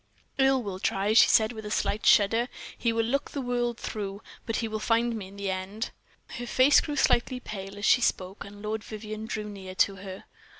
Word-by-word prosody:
"Earle 270 -1 +4
will 195 -3 -5
try," 195 +2 0
she 225 - +8
said, 220 0 +4
with 220 -2 -8
a 210 - -6
slight 210 0 -1
shudder. 225 +4 +5 0.3
"He 230 - 0
will 225 0 +1
look 275 +5 -1
the 285 - -5
world 245 -2 -1
through, 200 -2 -5 0.2
but 225 - -1
he 225 - -1
will 215 0 -3
find 230 +2 +1
me 205 -4 -6
in 195 +1 -13
the 200 -1 -2
end." 190 +5 -4 0.5
Her 245 - -5
face 260 +4 +5
grew 295 - -4
slightly 255 -2 +2
pale 195 -4 -7
as 205 - -3
she 245 - +5
spoke, 190 -3 -1
and 205 0 -12
Lord 215 +1 -3
Vivianne 215 0 -7
drew 215 -1 -3
near 190 -2 -8
to 195 +1 +2
her. 190 0 -8
215 Hz, 215 wpm, -28 LUFS, 200-235 Hz, 0.5 s, she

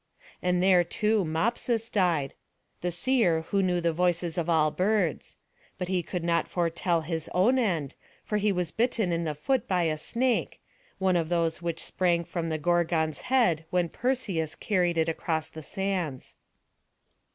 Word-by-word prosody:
And 180 0 +1
there, 185 -2 +5
too, 210 +4 +1
Mopsus 225 +7 0
died, 175 - +1 0.5
the 180 - -1
seer 175 -3 +2
who 200 - +3
knew 180 -2 +1
the 170 -1 0
voices 175 -1 0
of 170 -1 -2
all 155 -2 +3
birds; 190 -3 0 0.4
but 180 -1 -4
he 185 -1 +1
could 175 +1 -5
not 170 0 +1
foretell 170 0 0
his 160 0 -4
own 235 +9 +4
end, 165 - 0 0.3
for 210 - -1
he 210 0 +2
was 180 -3 -1
bitten 225 -5 0
in 170 0 -1
the 155 -2 -2
foot 260 - 0
by 180 -2 +1
a 155 -2 0
snake, 240 +9 0 0.4
one 190 -1 +2
of 165 -2 0
those 170 -1 0
which 170 -1 -3
sprang 175 -2 +1
from 170 -1 -4
the 160 - -1
Gorgon's 160 -1 +1
head 185 -12 +3
when 180 -2 +1
Perseus 205 - -1
carried 180 -5 0
it 160 0 +2
across 160 -1 -2
the 160 - -9
sands. 180 -6 -3
175 Hz, 165 wpm, -27 LUFS, 165-195 Hz, 0.5 s, there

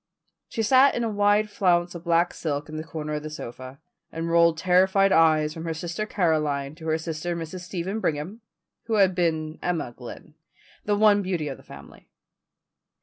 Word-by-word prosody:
She 225 - -2
sat 260 +5 +5
in 240 - -1
a 230 - -1
wide 205 +1 +2
flounce 175 -4 +1
of 170 0 -9
black 170 +1 +2
silk 145 -3 -3
in 155 - -6
the 155 - -4
corner 155 -1 -5
of 150 - -2
the 155 - -6
sofa, 130 -2 -9 0.3
and 165 +1 -4
rolled 170 -1 +4
terrified 190 +3 +3
eyes 155 -3 +4
from 160 - -7
her 165 -1 -3
sister 175 +6 -4
Caroline 150 -7 0
to 160 0 -10
her 160 0 +1
sister 165 +1 -4
Mrs. 165 +2 -6
Stephen 185 +3 -4
Brigham, 170 +5 -3 0.4
who 225 -1 -1
had 195 -3 +4
been 160 -3 -1
Emma 165 -9 -2
Glynn, 125 +4 -11 0.5
the 205 - +1
one 205 -1 +5
beauty 180 -5 -2
of 135 - -6
the - - -16
family. 70 0 -14
170 Hz, 185 wpm, -25 LUFS, 155-190 Hz, 0.5 s, sat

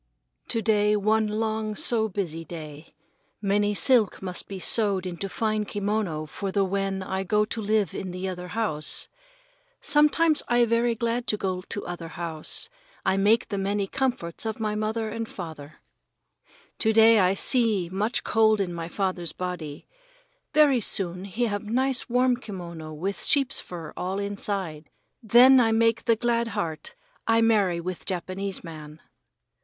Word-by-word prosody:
To 225 - 0
day 210 -1 +3
one 215 +1 +2
long 215 0 -2
so 220 0 +1
busy 175 -5 -3
day. 155 -2 -9 0.5
Many 205 0 +1
silk 215 +3 +4
must 185 -2 -4
be 195 -1 -6
sewed 200 -2 +1
into 185 +2 -4
fine 215 +1 -1
kimono 205 -6 -2
for 195 +5 -5
the 195 0 +2
when 195 0 -2
I 190 0 -3
go 210 +3 +2
to 225 +1 -4
live 210 -1 +1
in 190 -2 -5 0.2
other 180 -1 -5
house. 180 -7 0 0.7
Sometimes 300 +2 +3
I 240 0 +4
very 230 +1 +1
glad 235 +1 -1
I - - 0
go 185 -3 -2
to 205 - -5
other 175 -1 -6
house. 165 - -2 0.4
I 190 - +3
make 210 +4 +3
the 200 -2 -2
many 200 +1 0
comforts 240 -7 -2
of 220 0 -3
my 215 -1 -1
mother 215 +1 -2
and 230 0 -4
my - - -14
father. 155 -5 -8 1.0
To 220 - +3
day 225 0 +7
I 185 0 +3
see 220 -5 +3
the 175 - -12
much 210 +5 0
cold 220 -1 +3
in 185 -3 -1
my 165 -1 -5
father's 180 -3 -2
body. 175 -5 -6 0.7
Very 290 -4 +5
soon 185 -2 0
he 220 +5 -1
have 205 -3 -2
nice 255 +4 0
warm 250 0 +3
kimono 170 -8 -8
with 185 +6 -3
sheep's 275 -3 +2
fur 165 -4 -7
all 185 +2 -3
inside. 200 -6 -4 0.3
Then 250 +4 +7
I 225 -2 +3
make 230 +1 +2
the 230 - +4
glad 235 0 0
heart, 170 - -4 0.3
I 225 0 +4
marry 205 -6 +3
with 180 +1 -6
Japanese 190 +1 -3
man. 155 -2 -10
205 Hz, 160 wpm, -26 LUFS, 180-225 Hz, 1.0 s, day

